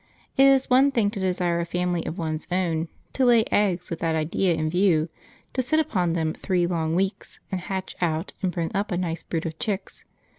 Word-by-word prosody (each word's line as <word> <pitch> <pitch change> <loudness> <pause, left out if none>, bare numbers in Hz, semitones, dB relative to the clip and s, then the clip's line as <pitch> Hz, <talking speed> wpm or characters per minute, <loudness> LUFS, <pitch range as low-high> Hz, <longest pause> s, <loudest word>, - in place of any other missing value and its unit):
It 270 0 +6
is 270 -1 +4
one 260 +2 +5
thing 230 -7 +1
to 210 - -5
desire 180 -2 0
a - - 0
family 180 0 -1
of 165 - -4
one's 155 -3 -3
own, 170 -3 0 0.3
to 265 - +1
lay 240 -3 +6
eggs 190 -4 +1
with 165 - -3
that 165 -1 0
idea 165 +3 +1
in 155 -1 -1
view, 170 -2 +2 0.4
to 260 - +1
sit 270 +5 +1
upon 180 - +1
them 160 -2 0
three 180 -3 0
long 165 -2 -1
weeks 195 +3 -2
and 185 -2 -2
hatch 190 0 -4
out 165 0 -1
and 185 -2 0
bring 170 -2 -2
up 205 +1 -1
a 175 - 0
nice 170 -2 -2
brood 165 0 -3
of 160 -1 -5
chicks. 205 -2 -4
180 Hz, 215 wpm, -25 LUFS, 165-200 Hz, 0.4 s, It